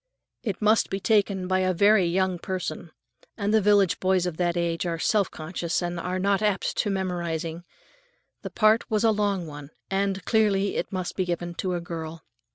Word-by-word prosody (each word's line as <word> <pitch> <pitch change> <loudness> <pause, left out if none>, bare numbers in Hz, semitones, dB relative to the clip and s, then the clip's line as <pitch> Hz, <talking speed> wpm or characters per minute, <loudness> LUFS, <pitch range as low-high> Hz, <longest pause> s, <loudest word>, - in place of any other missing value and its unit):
It 210 -2 -4
must 215 +1 +3
be 195 - -2
taken 200 -3 +1
by 185 0 +2
a 185 -1 +1
very 200 +1 +5
young 185 0 0
person, 175 -3 -4 0.5
and 205 -1 0
village 200 -3 +4
boys 185 -1 +2
of 175 -3 -3
that 175 -1 0
age 170 -1 -1
are 165 -1 -2
self 200 +3 +1
conscious 165 +1 -3
and 175 -1 -3
are 180 +1 -2
not 200 +1 +1
apt 210 -2 0
at 205 - -1
memorizing. 170 -3 -3 0.8
The - - -6
part 215 0 +3
was 215 0 +1
a 225 - +5
long 205 -4 0
one, 145 -2 -9 0.2
and 195 0 -1
clearly 205 -3 +2
it - - -3
must 185 -2 -3
be 190 - 0
given 175 0 -3
to 180 +1 -2
a 175 - -3
girl. 165 -1 -7
185 Hz, 185 wpm, -26 LUFS, 175-200 Hz, 0.8 s, very